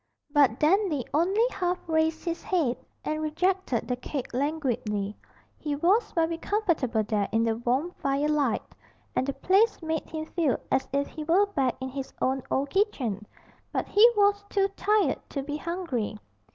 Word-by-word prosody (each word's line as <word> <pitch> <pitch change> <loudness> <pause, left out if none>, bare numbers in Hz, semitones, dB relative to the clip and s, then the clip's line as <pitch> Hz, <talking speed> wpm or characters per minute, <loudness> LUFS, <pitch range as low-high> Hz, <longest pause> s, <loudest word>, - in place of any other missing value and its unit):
But 275 -5 +4
Dandy 315 - +2
only 380 +9 +3
half 360 -1 -1
raised 320 0 +1
his 335 -1 -2
head 315 -10 +1 0.3
and 310 0 -1
rejected 325 - 0
the 250 - 0
cake 250 +1 -5
languidly 240 -8 -1 0.4
he 295 -1 -2
was 390 +9 +2
very 330 0 0
comfortable 315 - 0
there 210 -1 -1
in 225 +1 +2
the 225 -1 +1
warm 255 +8 0
firelight, 280 -2 +1 0.5
and 260 - +1
the 275 - 0
place 400 +9 +3
made 320 -1 -2
him 315 0 -4
feel 315 -6 0
as 265 - +2
if 280 +1 +1
he 310 - -7
were 350 +6 +4
back 275 -11 0
in 260 0 -4
his 270 0 -6
own 265 +1 +1
old 275 +1 0
kitchen, 250 - 0 0.4
but - - -1
he 435 +4 +7
was 405 0 +4
too 395 -1 +2
tired 415 +1 +1
to 275 - -3
be 295 +1 -4
hungry. 305 - -3
305 Hz, 165 wpm, -27 LUFS, 260-360 Hz, 0.5 s, he